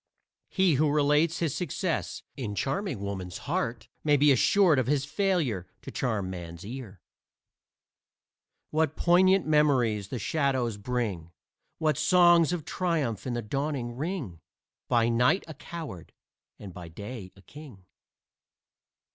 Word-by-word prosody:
He 190 -4 +3
who 155 - +3
relates 150 +3 +2
his 160 -5 -1
success 180 0 -3
in 115 -7 -4
charming 135 - -2
woman's 95 -3 -5
heart 115 0 -2 0.2
may 150 -1 +4
be 145 +1 +5
assured 160 - +4
of 125 - 0
his 140 -1 +1
failure 150 - 0 0.2
to - - -7
charm 110 -7 -1
man's 85 -1 -7
ear. 110 -5 -8 1.7
What 155 -1 +1
poignant 185 +2 +4
memories 130 -10 +2
the 125 - -4
shadows 130 -3 0
bring 100 -7 -3 0.5
What 155 -1 +1
songs 175 +1 +5
of 175 -4 -3
triumph 155 - -1
in 120 - -2
the 120 - -3
dawning 135 0 -3
ring! 145 - -4 0.5
By 115 -1 +3
night 125 +10 +3
a 160 - -7
coward 150 - -8 0.4
and 95 -3 -10
by 85 -1 -9
day 100 +3 -8
a 95 - -18
king. 135 -11 -13
135 Hz, 130 wpm, -28 LUFS, 105-160 Hz, 1.7 s, be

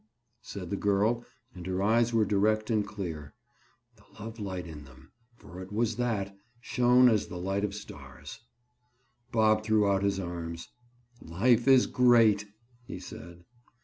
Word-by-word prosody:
said 90 -2 -8
the - - 0
girl 105 +4 +1 0.3
and 90 -1 -9
her 95 0 -2
eyes 115 +3 +3
were 115 -2 +2
direct 110 +2 +1
and 105 -2 +1
clear. 80 -9 -7 0.6
The - - -22 0.2
love 110 +2 -8
light 95 -3 -5
in 75 -3 -9
them—for 90 - -15
it 95 - -10
was 115 +1 -1
that—shone 120 +3 +1
as 110 -4 +2
the 90 - -7
light 95 +3 -2
of 100 -1 -2
stars. 70 - -11 0.9
Bob 110 -1 +3
threw 110 -1 +2
out 100 -1 +2
his 100 -1 0
arms. 85 -2 -6 0.5
"Life 115 +9 +1
is 130 -2 +6
great," 115 -5 +4 0.4
he - - -6
said. 85 -1 -11
100 Hz, 145 wpm, -29 LUFS, 90-115 Hz, 0.9 s, is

